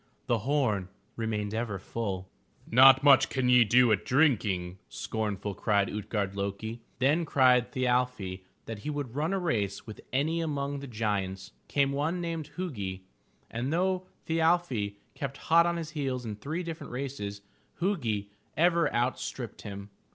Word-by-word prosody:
The 120 Hz, -2 st, +1 dB
horn 110 Hz, -7 st, 0 dB, 0.3 s
remained 105 Hz, -2 st, -2 dB
ever 110 Hz, -3 st, -2 dB
full. 95 Hz, -2 st, -4 dB, 0.4 s
"Not 135 Hz, +3 st, +7 dB
much 140 Hz, -2 st, +7 dB
can 130 Hz, -2 st, 0 dB
ye 125 Hz, -1 st, +7 dB
do 120 Hz, +2 st, +5 dB
at 105 Hz, -, +2 dB
drinking/* 100 Hz, -, +1 dB
scornful, 105 Hz, -, -3 dB
cried 100 Hz, -1 st, +1 dB
Ut'gard 105 Hz, -2 st, -2 dB
lo'ki. 100 Hz, +3 st, -4 dB, 0.2 s
Then 145 Hz, +7 st, +3 dB
cried 130 Hz, -5 st, +4 dB
Thi 130 Hz, -, -3 dB
arfi 125 Hz, -7 st, 0 dB, 0.2 s
that 115 Hz, -2 st, -6 dB
he 150 Hz, -, -5 dB
would 145 Hz, -5 st, -4 dB
run 150 Hz, +5 st, -1 dB
a 195 Hz, -, +1 dB
race 105 Hz, -, -1 dB
with 110 Hz, -, -9 dB
any 155 Hz, +5 st, +1 dB
among 145 Hz, -3 st, -2 dB
the 140 Hz, -, -7 dB
giants. 100 Hz, -5 st, -2 dB, 0.2 s
Came 140 Hz, -1 st, +2 dB
one 150 Hz, +6 st, -1 dB
named 165 Hz, -3 st, -4 dB
Hu'gi, 100 Hz, -, -4 dB, 0.5 s
and, 120 Hz, +5 st, -2 dB
though 185 Hz, +2 st, 0 dB, 0.2 s
Thi 160 Hz, -, 0 dB
arfi 160 Hz, -12 st, +1 dB, 0.2 s
kept 135 Hz, -1 st, -5 dB
hot 170 Hz, +1 st, +4 dB
on 170 Hz, 0 st, 0 dB
his 165 Hz, -1 st, -5 dB
heels 135 Hz, -5 st, -2 dB
in 110 Hz, -2 st, -4 dB
three 155 Hz, -, -4 dB
different 165 Hz, -3 st, -6 dB
races, 125 Hz, -6 st, -4 dB, 0.4 s
Hu'gi 115 Hz, -, -1 dB, 0.3 s
ever 170 Hz, -1 st, +3 dB
outstripped 120 Hz, -1 st, -2 dB
him. 100 Hz, -1 st, -8 dB
125 Hz, 155 wpm, -29 LUFS, 105-150 Hz, 0.5 s, Not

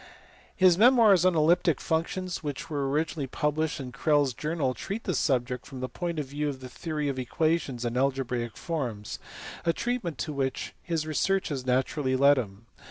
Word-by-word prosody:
His 185 Hz, -1 st, +5 dB
memoirs 220 Hz, -7 st, +6 dB
on 185 Hz, -2 st, +4 dB
elliptic 160 Hz, -1 st, +3 dB
functions 175 Hz, +3 st, -2 dB
which 145 Hz, +1 st, -5 dB
were 140 Hz, -2 st, -1 dB
originally 150 Hz, 0 st, -1 dB
published 150 Hz, +4 st, -1 dB
in 130 Hz, -2 st, -6 dB
Crellds 145 Hz, 0 st, +2 dB
Journal 150 Hz, -1 st, -1 dB
treat 200 Hz, -, -5 dB
the -, -, -1 dB
subject 125 Hz, -3 st, 0 dB
from 135 Hz, -2 st, -8 dB
the 130 Hz, -, -2 dB
point 170 Hz, +3 st, -4 dB
of 150 Hz, -, -1 dB
view 145 Hz, +2 st, -2 dB
of 135 Hz, -2 st, -5 dB
the 130 Hz, -1 st, -9 dB
theory 150 Hz, +1 st, -3 dB
of 135 Hz, -2 st, -2 dB
equations 135 Hz, -1 st, 0 dB
and 120 Hz, 0 st, -2 dB
algebraic 125 Hz, -3 st, -1 dB
forms, 125 Hz, -11 st, -4 dB, 0.4 s
a 165 Hz, -, +2 dB
treatment 230 Hz, -, -2 dB
to 120 Hz, +6 st, -3 dB
which 135 Hz, -2 st, -2 dB
his 165 Hz, -3 st, -2 dB
researches 155 Hz, -4 st, 0 dB
naturally 130 Hz, +1 st, +1 dB
led 140 Hz, +1 st, +5 dB
him. 105 Hz, -1 st, -7 dB
145 Hz, 170 wpm, -28 LUFS, 130-165 Hz, 0.4 s, memoirs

